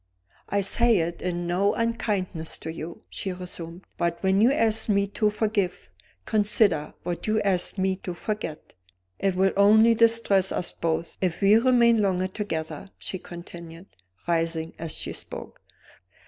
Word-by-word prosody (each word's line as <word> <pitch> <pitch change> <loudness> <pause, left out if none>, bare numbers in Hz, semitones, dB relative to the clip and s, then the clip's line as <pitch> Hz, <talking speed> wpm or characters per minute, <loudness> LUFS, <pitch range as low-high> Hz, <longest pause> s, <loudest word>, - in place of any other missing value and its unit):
"I 200 - +1
say 230 +3 +3
it 170 0 -2
in 175 -1 -2
no 185 +4 +1
unkindness 200 -8 -1
to 160 - -6
you," 165 +1 -8
she 190 - -5
resumed. 180 -1 -7 0.2
"But 170 0 0
when 190 +1 +3
you 240 +4 +5
ask 225 -6 +2
me 200 -1 +3
to 210 +1 +1
forgive, 205 - -2 0.3
consider 205 -7 +1
what 175 +3 -4
you 215 0 +2
ask 190 -1 +2
me 190 0 0
to 180 -2 -6
forget. 170 -5 -5 0.5
It 195 -1 0
will 190 +1 +2
only 215 +3 +6
distress 225 -4 +3
us 175 - -2
both 165 0 -3
if 180 -1 -1
we 200 +2 +6
remain 235 -2 +4
longer 185 -2 +1
together," 165 -4 -5
she 185 - -5
continued, 170 0 -10 0.4
rising 165 -1 -1
as 165 -1 -5
she - - -4
spoke. - - -8
190 Hz, 150 wpm, -25 LUFS, 170-210 Hz, 0.5 s, only